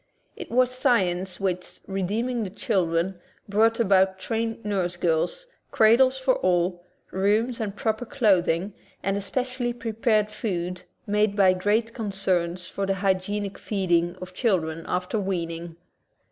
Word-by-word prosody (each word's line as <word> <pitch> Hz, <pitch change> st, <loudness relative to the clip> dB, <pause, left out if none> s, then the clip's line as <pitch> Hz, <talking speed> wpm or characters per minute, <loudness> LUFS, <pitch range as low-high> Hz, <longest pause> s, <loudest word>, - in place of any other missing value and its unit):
It 350 Hz, -, -8 dB
was 255 Hz, +1 st, +3 dB
science 190 Hz, -8 st, +1 dB
which, 185 Hz, -2 st, -3 dB
redeeming 215 Hz, +6 st, -1 dB
the 195 Hz, -, -4 dB
chil 200 Hz, -3 st, 0 dB
dren, 175 Hz, +3 st, -1 dB, 0.3 s
brought 225 Hz, +3 st, +3 dB
about 190 Hz, -3 st, +3 dB
trained 225 Hz, +3 st, -3 dB
nurse 185 Hz, -4 st, -1 dB
girls, 175 Hz, -, 0 dB, 0.2 s
cradles 255 Hz, +4 st, +5 dB
for 260 Hz, 0 st, +2 dB
all, 175 Hz, -1 st, +1 dB, 0.3 s
rooms 215 Hz, +5 st, +1 dB
and 210 Hz, -3 st, -3 dB
proper 220 Hz, +2 st, -1 dB
clothing, 190 Hz, -5 st, +2 dB, 0.3 s
and 195 Hz, 0 st, 0 dB
especially 245 Hz, +5 st, -2 dB
prepared 225 Hz, -2 st, 0 dB
foods 180 Hz, -4 st, -3 dB, 0.2 s
made 210 Hz, 0 st, +1 dB
by 190 Hz, -3 st, +5 dB
great 210 Hz, +5 st, 0 dB
con 220 Hz, -4 st, -4 dB
cerns 180 Hz, -2 st, -1 dB
for 200 Hz, 0 st, -3 dB
the 195 Hz, -, +1 dB
hygienic 195 Hz, +1 st, -1 dB
feeding 175 Hz, -4 st, 0 dB
of 185 Hz, 0 st, -9 dB
children 165 Hz, -7 st, 0 dB
after 180 Hz, +4 st, -1 dB
weaning. 170 Hz, -3 st, -3 dB
195 Hz, 135 wpm, -25 LUFS, 180-225 Hz, 0.3 s, cradles